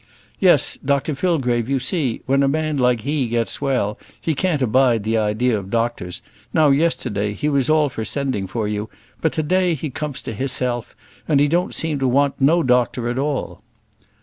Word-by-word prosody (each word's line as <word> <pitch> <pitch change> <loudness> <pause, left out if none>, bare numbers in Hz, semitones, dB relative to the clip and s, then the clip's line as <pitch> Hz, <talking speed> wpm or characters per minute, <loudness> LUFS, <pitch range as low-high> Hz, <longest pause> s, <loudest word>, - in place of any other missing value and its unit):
"Yes, - - +3
Dr 140 +2 0
Fillgrave; 130 -8 0
you 135 - +2
see, 135 -2 -2
when 135 +1 +2
a 140 - +3
man 155 +2 0
like 125 -2 +2
he 140 +1 -1
gets 115 +2 -2
well, 125 -7 0 0.2
he 160 - -1
can't 155 -2 0
abide 125 -2 +3
the 110 +2 0
idea 110 +3 +1
of 95 -2 -5
doctors: 115 -6 -2 0.3
now, 155 +1 +4
yesterday, 105 -9 0
he 145 - -2
was 140 -1 +1
all 155 -1 +4
for 120 -5 -5
sending 130 -6 -2
for 110 +2 -2
you; 105 +1 -3 0.3
but 160 - +2
to 155 - -1
day 180 +1 +2
he 150 0 -5
comes 150 0 -5
to - - -5
hisself, 125 0 -2 0.3
and 145 -2 +4
don't 175 +2 0
seem 155 -3 -1
to 135 - +1
want 140 +2 +1
no 165 +5 +4
doctor 125 -1 +1
at 120 +2 -2
all." 145 -1 -2
135 Hz, 185 wpm, -21 LUFS, 115-150 Hz, 0.3 s, now